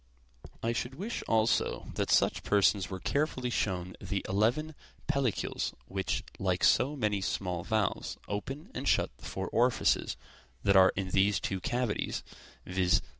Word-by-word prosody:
I 115 +1 +1
should 125 +3 -3
wish 205 +10 -4
also 110 0 +1
that - - -1
such - - +3
persons 100 -2 +3
were 95 -1 -5
carefully 130 - -1
shown 90 -5 -1
the 95 +1 -3
eleven 120 +11 +1 0.3
pellicles 140 -7 -1
which, 95 0 -2 0.2
like 90 -2 0
so 140 +4 +4
many 105 -6 0
small 90 -2 -2
valves, 110 -2 -1
open 135 +9 -5
and - - -4
shut - - +2
the - - -12
four 95 0 -4
orifices 120 +1 +2 0.5
that 100 -1 +4
are 95 -1 +7
in 95 -1 -2
these 100 0 +3
two 95 - -2
cavities, 120 +2 -1 0.4
viz. 90 -2 +2
105 Hz, 145 wpm, -31 LUFS, 95-125 Hz, 0.5 s, are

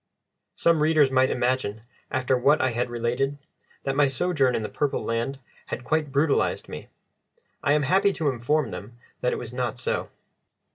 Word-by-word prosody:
Some 165 -2 +3
readers 155 -3 +4
might 130 0 +4
imagine, 125 -4 -1 0.3
after 130 0 +1
what 140 +4 +4
I 130 - +2
had 120 +1 -1
related, 120 +4 -1 0.5
that 135 - -1
my 145 0 +4
sojourn 135 -2 +1
in 110 - -1
the - - -2
Purple 145 -2 -1
Land 115 +4 -1 0.3
had 125 - -5
quite 155 +1 0
brutalised 140 +1 +1
me; - - -8 0.7
I 145 - +3
am 150 -1 +2
happy 190 +7 +3
to 155 -5 0
inform 135 +5 0
them 115 +4 -8 0.2
that 125 - +1
it - - -2
was 120 0 -7
not 125 -2 -2
so. 125 - -2
130 Hz, 175 wpm, -25 LUFS, 125-150 Hz, 0.7 s, readers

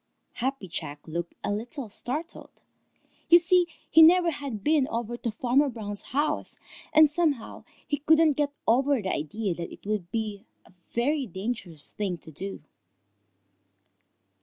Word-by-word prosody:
Happy 260 -4 -2
Jack 150 -4 -6
looked 170 +2 -4
a - - -1
little 235 +5 -4
startled. 290 - -4 0.8
You 345 - +10
see, 355 0 +3 0.2
he 320 - +6
never 345 +1 +7
had 275 -9 -6
been 300 -3 +3
over 235 0 -3
to 240 - -3
Farmer 250 +6 +2
Brown's 205 -4 -5
house, 290 +3 -1 0.3
and 310 0 +7
somehow 295 -6 -1 0.2
he 290 - -1
couldn't 315 +1 +4
get 285 0 0 0.2
over 270 +3 +3
the 190 -3 -2
idea 185 +6 -2
that 170 0 -6
it - - -13
would 205 -4 -2
be 215 -1 -4 0.2
a - - -20 0.2
very 270 +3 0
dangerous 190 -6 -3
thing 195 -4 -3
to 160 0 -14
do. 190 +2 -6
240 Hz, 145 wpm, -27 LUFS, 200-295 Hz, 0.8 s, You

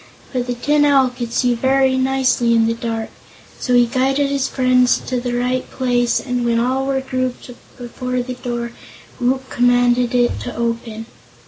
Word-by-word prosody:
But 250 -1 -2
the 245 - -2
Tin 290 +5 +2
Owl 275 -3 +4
could 245 -2 -6
see 245 +1 +1
very 265 +2 +2
nicely 260 -3 +2
in 225 0 +3
the 230 - +1
dark, 230 -1 -4 0.5
so 250 - 0
he 245 0 +5
guided 270 +3 0
his 275 -1 0
friends 255 -1 +3
to 250 -1 -2
the 245 -1 -3
right 250 +1 -1
place 245 -2 0
and 250 -2 -2
when 235 -1 +1
all 260 +3 0
were 270 -1 0
grouped 255 -1 -4 0.3
before 250 0 -4
the 255 +1 -5
door 240 -1 -4 0.5
Woot 260 +2 0
commanded 245 0 +2
it 245 -1 +2
to 245 - -6
open. 230 -1 -3
250 Hz, 175 wpm, -19 LUFS, 240-260 Hz, 0.5 s, he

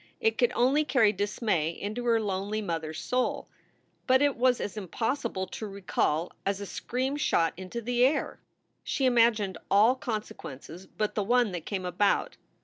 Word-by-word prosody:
It 450 -1 +1
could 485 - +4
only 270 +5 +3
carry 245 -7 +3
dismay 205 -5 0
into 210 +8 -5
her 230 -1 +3
lonely 205 0 -2
mother 165 -6 -3
s 155 - -7
soul. 250 0 -1 0.6
But 260 +1 +5
it 285 -2 +2
was 250 0 +3
as 205 - -4
impossible 220 - -2
to 215 +3 -6
recall 180 -4 -1
as 195 0 -1
a 200 - -5
scream 260 +7 -3
shot 165 - +2
into 185 +6 -6
the 245 +1 +1
air. 275 +4 +1 0.4
She 270 - -1
imagined 230 -7 +3
all 215 +5 +5
consequences 190 - -6
but 215 -1 -2
the 210 - 0
one 240 +1 +2
that 175 -3 -6
came 190 -3 -3
about. 180 +3 +1
215 Hz, 165 wpm, -28 LUFS, 190-245 Hz, 0.6 s, But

